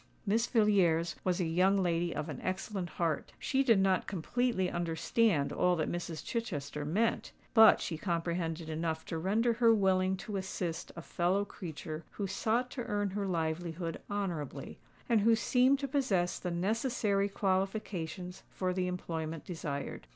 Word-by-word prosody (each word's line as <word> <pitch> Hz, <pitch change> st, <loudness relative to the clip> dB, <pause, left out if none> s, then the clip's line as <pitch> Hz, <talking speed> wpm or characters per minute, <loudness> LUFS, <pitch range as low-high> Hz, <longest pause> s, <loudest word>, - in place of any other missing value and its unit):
Miss 225 Hz, +3 st, +2 dB
Villiers 180 Hz, -7 st, +3 dB
was 185 Hz, 0 st, +1 dB
a 180 Hz, -, +1 dB
young 185 Hz, +4 st, +3 dB
lady 175 Hz, -2 st, +1 dB
of 150 Hz, 0 st, -3 dB
an 145 Hz, -5 st, -6 dB
excellent 185 Hz, 0 st, -3 dB
heart: 160 Hz, 0 st, -2 dB
she 270 Hz, -1 st, +1 dB
did 230 Hz, -6 st, +5 dB
not 190 Hz, -1 st, +2 dB
completely 205 Hz, +2 st, 0 dB
understand 170 Hz, 0 st, +1 dB
all 180 Hz, 0 st, +3 dB
that 155 Hz, -2 st, -1 dB
Mrs. 170 Hz, -3 st, -4 dB
Chichester 150 Hz, -, -3 dB
meant; 215 Hz, +10 st, 0 dB, 0.2 s
but 220 Hz, -2 st, +8 dB
she 160 Hz, -3 st, -4 dB
comprehended 170 Hz, -2 st, -2 dB
enough 160 Hz, 0 st, -2 dB
to 165 Hz, -, -3 dB
render 220 Hz, +7 st, +2 dB
her 230 Hz, 0 st, +4 dB
willing 190 Hz, -2 st, +2 dB
to 200 Hz, +1 st, -5 dB
assist 180 Hz, -3 st, -4 dB
a 170 Hz, -, -7 dB
fellow 185 Hz, +5 st, +1 dB
creature 160 Hz, -3 st, -7 dB
who 205 Hz, -, -3 dB
sought 225 Hz, +6 st, 0 dB
to 245 Hz, -, -4 dB
earn 205 Hz, -1 st, -1 dB
her 200 Hz, 0 st, -2 dB
livelihood 165 Hz, 0 st, -2 dB
honourably, 180 Hz, -9 st, -4 dB, 0.3 s
and 230 Hz, -4 st, +3 dB
who 225 Hz, +2 st, +5 dB
seemed 250 Hz, +5 st, +3 dB
to 275 Hz, 0 st, -3 dB
possess 220 Hz, -11 st, +1 dB
the 180 Hz, -, -3 dB
necessary 200 Hz, +2 st, 0 dB
qualifications 190 Hz, -3 st, -2 dB
for 185 Hz, -1 st, -2 dB
the 180 Hz, 0 st, 0 dB
employment 165 Hz, -3 st, -4 dB
desired. 145 Hz, -5 st, -5 dB
185 Hz, 155 wpm, -32 LUFS, 165-210 Hz, 0.3 s, but